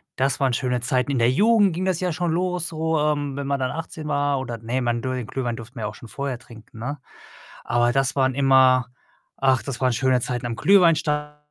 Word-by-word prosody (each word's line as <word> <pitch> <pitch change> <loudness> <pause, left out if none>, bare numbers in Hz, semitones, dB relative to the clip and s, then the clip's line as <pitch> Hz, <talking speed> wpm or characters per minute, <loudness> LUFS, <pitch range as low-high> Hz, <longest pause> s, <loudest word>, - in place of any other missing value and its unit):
Das 135 +1 0
waren 130 -3 +1
schöne 125 +1 0
Zeiten. 125 +2 0
In 130 - 0
der 115 - +4
Jugend 205 - +4
ging 180 - -3
das 185 -3 0
ja 180 -2 -1
schon 175 +1 -1
los 180 0 -1
so, 160 0 -1
ähm, 145 -2 0
wenn 140 - -4
man 140 0 0
dann 130 -1 -1
18 160 -1 -6
war 145 -1 0
oder 120 -3 -5
ne, 120 +4 -2
man 120 -1 -1
dur 130 0 -2
den 125 -3 -5
Glühwein 120 -2 -3
durften 120 +3 -11
wir 115 - -6
ja 105 - -2
auch - - -8
schon 120 - -12
vorher 135 +1 -4
trinken, 115 -2 -15
ne? 140 +5 -4 0.7
Aber 120 0 +2
das 135 +2 0
waren 130 -2 +1
immer 130 -2 +4 0.5
ach, 130 -2 +2
das 135 -3 -5
waren 130 -1 +3
schöne 130 +1 +2
Zeiten 120 0 -3
am 120 -1 -3
Glühwein-Stand 150 - +3
135 Hz, 230 wpm, -23 LUFS, 125-150 Hz, 0.7 s, der